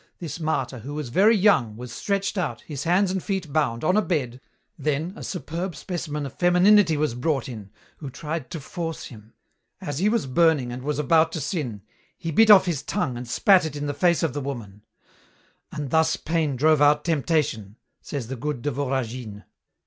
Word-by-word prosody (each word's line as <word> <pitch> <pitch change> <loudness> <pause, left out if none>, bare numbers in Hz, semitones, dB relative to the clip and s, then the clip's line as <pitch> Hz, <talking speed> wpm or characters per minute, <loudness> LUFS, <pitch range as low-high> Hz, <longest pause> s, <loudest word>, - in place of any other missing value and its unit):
This 170 -1 -6
martyr, 135 -6 -2
who 140 +6 -7
was 150 -5 -4
very 210 - +4
young, 135 - +3
was 125 0 -8
stretched 200 0 -2
out, 150 - -2
his 140 -3 -6
hands 180 +3 +3
and 190 -1 -2
feet 190 -7 -3
bound, 135 -6 0
on 185 +5 +2
a 215 - +4
bed, 130 - -2 0.3
then 155 +4 -2
a - - -9
superb 175 -1 -4
specimen 150 -2 -4
of 135 - -7
femininity 180 -1 +5
was 150 -4 0
brought 135 +2 -1
in, 110 -6 -8 0.3
who 145 - -7
tried 155 +1 -5
to 165 - -5
force 165 +2 -5
him. 110 -3 -13 0.5
As 145 0 -4
he 200 +4 +3
was 230 -5 0
burning 145 -2 +2
and 125 +1 -6
was 150 +2 -2
about 160 +3 +3
to 160 - -2
sin, 135 - -4 0.3
he 165 - -4
bit 225 +8 +5
off 200 -3 +9
his 170 -6 -1
tongue 125 - -2
and 120 +1 -7
spat 190 - +4
it 155 -2 -4
in 145 0 -4
the 145 - -2
face 170 +4 +2
of 165 - 0
the 145 - -3
woman, 115 -7 -7 0.9
"and 145 -3 -5
thus 160 0 +3
pain 160 -4 -1
drove 155 +3 +3
out 145 0 +4
temptation," 150 - 0 0.3
says 140 -5 -5
the 130 +4 -5
good 130 0 -4
de 145 - 0
Voragine." 125 -5 -3
150 Hz, 195 wpm, -24 LUFS, 130-170 Hz, 0.9 s, off